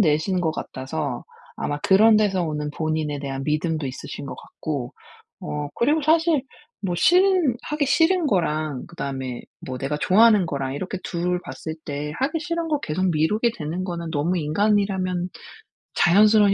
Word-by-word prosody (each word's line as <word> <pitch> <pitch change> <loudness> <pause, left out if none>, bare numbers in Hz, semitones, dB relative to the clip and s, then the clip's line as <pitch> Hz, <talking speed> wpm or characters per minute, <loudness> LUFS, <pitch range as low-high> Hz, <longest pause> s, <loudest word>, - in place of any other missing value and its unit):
내신 180 +2 +2
것 160 -2 0
같아서 135 -1 -4 0.3
아마 145 0 -2
그런 215 +3 +6
데서 195 -4 +2
오는 150 -2 -3
본인에 155 -2 -2
대한 135 -1 -4
믿음도 155 0 0
있으신 130 +1 -7
것 - - -6
같고. 140 -6 -5 0.5
어 150 -1 -4
그리고 295 +7 +2
사실 320 -2 +3 0.4
뭐 185 -3 -2
싫은 360 - +4
하기 300 -1 -1
싫은 330 +3 +3
거랑 155 - 0
그다음에 135 -6 -5 0.2
뭐 130 -1 -4
내가 150 +3 -2
좋아하는 210 +1 +5
거랑 135 -3 -3
이렇게 185 +5 -4
2 180 +1 -1
봤을 160 -1 -6
때 145 0 -4
하기 305 +4 0
싫은 335 0 -2
것 300 -2 0
계속 180 +4 0
미루게 210 +9 +1
되는 165 +4 -3
거는 170 -3 -4
너무 165 +5 0
인간이라면 185 +1 +1 0.7
자연스러운 205 +2 +5
175 Hz, 320 characters per minute, -23 LUFS, 150-215 Hz, 0.7 s, 그런